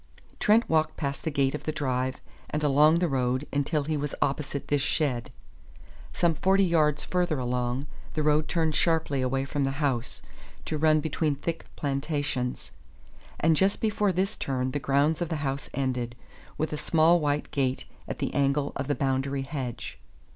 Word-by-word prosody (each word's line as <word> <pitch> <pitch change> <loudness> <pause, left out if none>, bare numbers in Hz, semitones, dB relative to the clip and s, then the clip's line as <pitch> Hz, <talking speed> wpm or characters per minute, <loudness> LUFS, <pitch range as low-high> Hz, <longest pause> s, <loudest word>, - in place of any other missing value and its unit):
Trent 220 +3 +4
walked 160 -1 +1
past 140 -1 -3
the - - 0
gate 140 -2 +1
of 150 - -5
the 155 - 0
drive 130 -4 -1 0.3
and 150 0 -2
along 150 +3 +5
the 175 +1 +2
road 130 -1 0
until 145 +1 +1
he 155 +2 -1
was 145 -1 -3
opposite 140 0 -1
this 145 -1 +1
shed. 140 -4 0 0.8
Some 170 -1 +2
forty 190 +5 +3
yards 155 -5 +2
further 175 -4 0
along, 125 +1 -1 0.3
the 155 - 0
road 150 0 +3
turned 160 -2 +1
sharply 160 -4 +1
away 135 +1 0
from 140 +1 -1
the 135 0 0
house, 135 -6 -1 0.4
to 155 - -2
run 155 0 +4
between 155 -1 0
thick 165 +4 -4
plantations; 140 -3 -2 0.7
and 165 0 +4
just 190 +5 +2
before 210 -2 +1
this 190 +4 0
turn 130 -1 -2
the 145 - -2
grounds 145 +4 +2
of 170 - -1
the 160 - -1
house 135 0 -3
ended, 125 -3 -2 0.4
with 155 0 -1
a - - -2
small 165 +3 +4
white 145 -1 -1
gate 130 -2 0 0.2
at - - -4
the - - -2
angle 140 0 +1
of 135 -1 -3
the 145 - +1
boundary 135 0 0
hedge. 135 -4 -5
145 Hz, 175 wpm, -27 LUFS, 135-160 Hz, 0.8 s, along